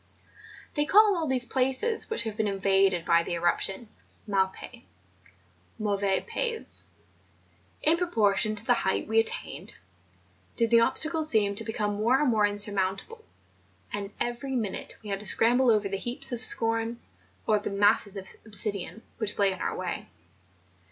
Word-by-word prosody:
They 295 -1 0
call 410 +4 +5
all 325 -3 -2
these 255 -2 0
places 265 - 0
which 445 - -2
have 220 -2 -5
been 215 -1 -1
invaded 195 -3 +1
by 170 0 +4
the 170 - -5
erup¬ 170 +1 +1
tions 195 +4 -3 0.4
mal 195 -2 +1
pais 235 +5 -12 1.0
(mauvais 200 -2 0
pays). 465 -2 -2 1.0
In 320 +2 +4
proportion 215 - +2
to 215 +1 -5
the 245 - +4
height 190 -5 -1
we 220 +1 +2
attained, 225 - -2 0.8
did 230 -1 +2
the 230 - +6
obstacles 315 +6 +1
seem 205 -5 +4
to 215 +3 0
become 210 -2 -3
more 235 +5 +2
and 295 -4 +2
more 210 -2 +3
insurmountable; 205 - -1 0.7
and 200 -1 -4
every 250 +3 -3
minute 215 -6 -4
we 210 - -7
had 195 - -2
to 210 - -7
scramble 245 +5 +3
over 210 -3 +2
the 195 0 -3
heaps 240 +6 -2
of 240 -1 -3
scoria, 225 -1 +1 0.5
or 215 -1 +2
the - - -5
masses 205 0 +2
of 190 -1 -7 0.2
obsidian, 205 0 +1 0.2
which 215 -2 +2
lay 200 -1 +3
in 185 - -7
our - - -3
way. - - -5
215 Hz, 160 wpm, -27 LUFS, 200-245 Hz, 1.0 s, the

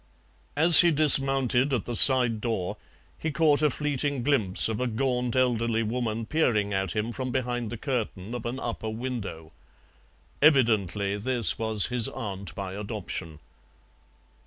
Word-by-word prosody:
As 160 +2 +7
he 175 - +3
dismounted 135 -3 +4
at 125 -6 -2
the 120 - -5
side 120 -4 +5
door 110 -6 -4 0.4
he 160 - -4
caught 150 0 +1
a 150 - +2
fleeting 145 -2 -3
glimpse 115 -10 +4
of 110 +1 -4
a 125 - -1
gaunt, 125 +1 -2
elderly 115 -3 0
woman 115 0 -4
peering 110 -8 -1
at 95 0 -3
him 110 +2 -3
from 130 +1 -6
behind 120 -2 -4
the 120 - -6
curtain 115 -5 -5
of 120 -1 -6
an 125 +3 -6
upper 115 -3 -6
window. 110 -9 -7 0.9
Evidently 105 - +1
this 115 -3 0
was 110 -3 -1
his 120 -3 +2
aunt 100 -2 -7
by 95 -2 -7
adoption. 100 -6 -7
120 Hz, 145 wpm, -25 LUFS, 105-130 Hz, 0.9 s, As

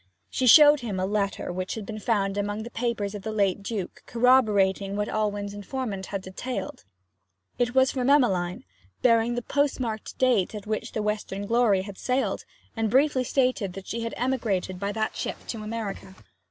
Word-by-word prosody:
She 255 - 0
showed 295 +3 +9
him 215 -7 -4
a 185 - 0
letter 200 -2 -1
which 185 +1 -3
had 220 -3 -6
been 215 0 -6
found 200 -3 0
among 205 +1 -2
the 240 - -8
papers 225 -4 -2
of 205 - -6
the 220 - -4
late 200 -2 +1
Duke, 200 -3 -5
corroborating 210 -6 +3
what 210 0 -1
Alwyn's 205 -1 -2
informant 205 -2 -4
had 195 -2 -4
detailed. 195 - -5 0.7
It 245 +1 0
was 260 0 +5
from 255 -1 0
Emmeline, 190 -11 +2 0.4
bearing 230 0 +4
the 240 - -3
postmarked 255 -6 -1
date 235 -6 +2
at 210 - -7
which 215 0 -3
the 215 - -2
Western 210 -1 -2
Glory 215 -4 +2
sailed, 255 +7 -1 0.3
and 225 -1 0
briefly 265 +2 +3
stated 250 -7 0
that 195 0 -8
she 230 - -4
had 230 0 -4
emigrated 220 -8 -1
by 200 +1 -2
that 215 +1 -2
ship - - -3
to 225 - -4
America. 215 -3 -5
215 Hz, 175 wpm, -26 LUFS, 200-245 Hz, 0.7 s, showed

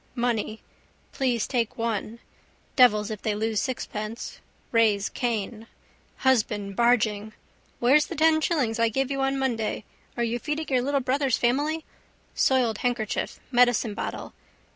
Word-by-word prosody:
Money. 230 -2 -1 0.5
Please 245 -5 0
take 235 -4 -1
one. 230 -1 -2 0.6
Devils 215 -5 +5
if 215 - -5
they 215 -2 -1
lose 220 0 0
sixpence. 225 -3 -5 0.3
Raise 215 -3 +3
Cain. 225 -2 -3 0.6
Husband 210 -6 +1
barging. 215 -3 +2 0.5
Where's 275 +5 +4
the - - -6
ten 315 +1 +4
shillings 255 -10 0
I 230 0 +3
gave 270 +4 -1
you 275 0 -1
on 270 0 +1
Monday? 235 -6 -1 0.3
Are 240 - +1
you 235 +1 -1
feeding 305 +3 -3
your 255 -2 +2
little 280 +2 0
brother's 265 0 +1
family? 290 +6 0 0.5
Soiled 245 -5 +2
handkerchief: 240 -4 -2
medicinebottle. 240 -3 +1
240 Hz, 130 wpm, -26 LUFS, 220-265 Hz, 0.6 s, Devils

